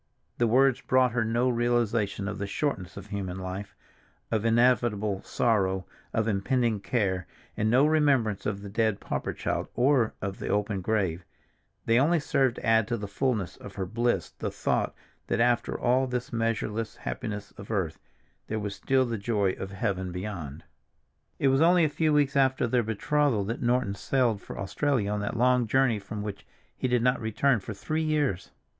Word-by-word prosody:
_" - - -46 0.4
The 120 - +3
words 130 +2 +4
brought 130 -1 +3
her 120 0 +1
no 115 +3 +1
realization 120 -4 0
of 105 -1 -4
the 100 - -2
shortness 100 - -2
of 100 - -7
human 95 -3 -4
life, 95 +2 -6 0.6
of 110 -2 +1
inevitable 115 -4 +2
sorrow, 95 -5 +1 0.3
of 110 0 0
impending 115 +2 +1
care, 95 -4 -1 0.3
and 110 +1 +1
no 130 +5 +5
remembrance 140 -9 +2
of 100 -1 -3
the 100 - -7
dead 110 -1 +1
pauper - - -3
child, - - -2
or 125 -3 +3
of 100 -1 -4
the - - -5
open 105 -1 0
grave—they 100 +4 -2
only 160 +5 +3
served 135 -4 +1
to - - -7
add 115 -2 +4
to 120 - -1
the 105 -1 -5
fullness 105 - -1
of - - -11
her 95 - -2
bliss 115 -2 0
the - - -4
thought - - -1 0.3
that - - 0
after 120 0 +1
all 130 +2 +2
this 125 -1 -4
measureless 115 -1 -1
happiness 105 - -5
of 100 - -11
earth, 95 -8 -1 0.5
there 110 - -2
was 105 -1 -3
still 130 +6 +1
the 115 -3 -3
joy 100 -2 +1
of 95 - -6
heaven 95 -2 -2
beyond. 90 -6 -6 0.8
II - - 0
IT - - +6
was 135 +2 +3
only 170 0 +5
a - - +1
few 155 +1 +1
weeks 145 -2 +2
after 130 -2 +3
their 120 +1 +2
betrothal 115 +2 +1
that 115 +5 -4
Norton 120 -3 +1
sailed 115 -1 0
for - - -9
Australia 105 +2 0
on 105 - -1
that 105 +3 -3
long 125 0 +3
journey 130 -2 +2
from 105 +1 -6
which 105 -1 -6 0.3
he - - -1
did 125 -2 +2
not 125 0 +2
return 115 +3 +2
for 105 +2 -7
three 155 +10 -2
years. 145 - 0
115 Hz, 185 wpm, -28 LUFS, 100-125 Hz, 0.8 s, IT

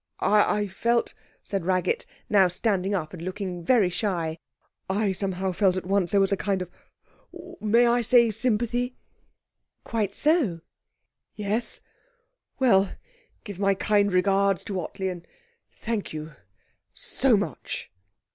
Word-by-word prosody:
'I 210 0 +3
I 205 - -1
felt,' 235 +5 0 0.3
said 195 -3 -3
Raggett, 185 - 0 0.2
now 195 -3 +5
standing 195 +1 0
up 155 -4 -3
and 175 - -8
looking 185 -1 -5
very 200 -2 +3
shy, 170 -5 -2 0.5
'I 200 +1 +1
somehow 190 0 -2
felt 185 0 +2
at 185 - -4
once 190 -2 +1
that - - -1
there 200 - +5
was 195 - +2
a 200 - +2
kind 195 -2 -1
of 180 - -13 0.9
may 230 +3 +4
I 240 +1 +3
say, 235 0 +4
sympathy?' 240 +3 0 0.9
'Quite 210 -4 -2
so.' 290 - +2 0.7
'Yes? 210 +3 -2 0.8
Well, 200 -7 +3 0.5
give 200 -4 -8
my 195 -1 +2
kind 205 +1 +2
regards 195 +1 +2
to 195 -2 -3
Ottley, 190 +4 -4
and 175 -2 -6 0.4
thank 225 -6 -4
you 155 0 -7 0.6
so - - +2
much.' - - -5
200 Hz, 135 wpm, -26 LUFS, 185-220 Hz, 0.9 s, now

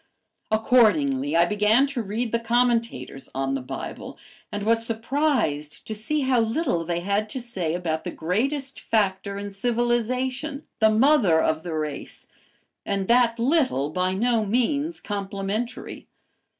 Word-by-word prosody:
Accordingly, 165 - +3
I 170 +1 +5
began 210 +7 +3
to 275 -3 -3
read 220 +3 -3
the 230 - +1
commentators 230 - 0
on 135 0 -1
the 135 - -2
Bible 125 - -7 0.3
and 205 0 -3
was 225 +1 +2
surprised 230 - -1
to 220 - -4
see 220 +8 -1
how 260 -2 +2
little 225 - 0
they 170 +1 -2
had 200 +3 0
to 260 - -4
say 190 -10 -2
about 160 -3 -2
the 180 - -4
greatest 265 - -1
factor 200 -2 0
in 200 0 -5
civilization, 245 +6 -1
the 220 -1 +5
mother 220 - +4
of 155 0 +1
the 165 -1 -5
race, 155 -2 -5 0.6
and 195 -1 -2
that 235 -1 +4
little 240 - +1
by 185 +2 0
no 230 +2 +2
means 280 +9 0
complimentary. 200 +3 -4
220 Hz, 140 wpm, -24 LUFS, 180-245 Hz, 0.6 s, I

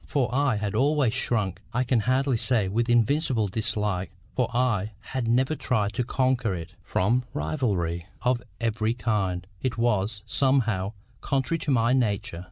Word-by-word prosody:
For 130 -4 0
I 135 -3 +2
had 105 -1 -2
always 135 0 +2
shrunk, 105 -7 -1
I 125 - +3
can 125 -1 +2
hardly 130 +4 +2
say 115 -3 +1
with 115 +5 0
invincible 120 -1 +2
dislike, 105 -3 -1 0.3
for - - +1
I 115 -5 +1
had 125 +3 -4
never 130 +6 +2
tried 105 -8 0
to 125 - 0
conquer 125 -4 +1
it, 85 -2 -7
from 115 +7 +1
rivalry 85 - -1 0.2
of 125 -1 +2 0.2
every 115 0 0
kind: 100 -6 -1 0.2
it 130 -3 -1
was, 105 -3 0
somehow, 110 -5 +1 0.3
contrary 140 +4 0
to - - -4
my 120 -1 +3
nature. 105 -7 0
115 Hz, 155 wpm, -26 LUFS, 105-130 Hz, 0.3 s, I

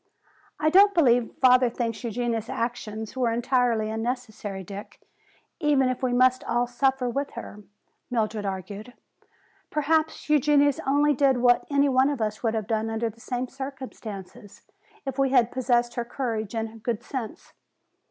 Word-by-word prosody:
"I 310 0 +2
don't 400 +3 +6
believe 245 -7 +3
father 250 -1 +5
thinks 230 -1 -3
Eugenia's 235 -1 -2
action 230 -2 -3
was 220 - -8
entirely 240 -2 +1
unnecessary, 220 -4 -4
Dick, 200 +3 -9 0.6
even 290 -5 +3
if 255 - -3
we 255 -1 0
must 255 +1 +3
all 240 +1 +1
suffer 260 +1 0
with 275 +4 -3
her," 210 - -8 0.5
Mildred 220 -3 -1
argued. 200 +4 -6 0.8
"Perhaps 310 +1 0
Eugenia 290 -1 +4
only 290 +2 +3
did 270 -1 +3
what 245 0 +3
any 280 0 +3
one 265 0 +3
of 285 -3 -2
us 215 -1 -2
would 225 -2 0
have 220 -2 -2
done 220 0 -1
under 225 +1 -2
the 230 +2 -20
same 250 +2 -3
circumstances, 250 -8 -9 0.4
if 270 0 -4
we 270 -1 +3
had 245 -3 +3
possessed 240 -2 +1
her 240 - -2
courage 230 -4 -4
and 225 0 -4
good 230 -1 -2
sense. 250 -5 -7
245 Hz, 150 wpm, -26 LUFS, 225-270 Hz, 0.8 s, don't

